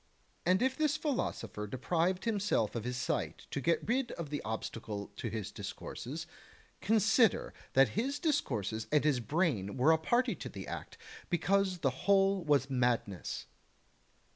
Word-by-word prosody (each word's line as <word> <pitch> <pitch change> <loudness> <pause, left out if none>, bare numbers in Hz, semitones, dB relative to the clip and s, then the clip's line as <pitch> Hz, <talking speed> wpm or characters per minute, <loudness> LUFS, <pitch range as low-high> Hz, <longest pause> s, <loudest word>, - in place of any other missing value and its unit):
And 185 +5 +4
if 260 0 +2
this 305 -2 +1
philosopher 115 - -2
deprived 170 - 0
himself 205 - +1
of 115 -1 -4
his 125 0 -2
sight 130 - -2
to 140 - -2
get 170 +6 +1
rid 250 +2 +1
of 155 -4 -6
the 145 - -2
obstacle 110 -2 -5
to 115 - -3
his 110 -1 -4
discourses, 100 -1 -6 0.6
consider 220 0 +3 0.2
that 135 -2 +6
his 265 - -1
discourses 110 - -1
and 150 -1 +4
his 145 -4 +3
brain 125 - 0
were 135 +6 +5
a 160 - +4
party 240 +10 +2
to - - -7
the - - -7
act, - - -6 0.3
because 190 0 +1
the 135 - +4
whole 195 +6 +3
was 145 -4 +3
madness. 120 -7 -1
155 Hz, 150 wpm, -33 LUFS, -, 0.6 s, that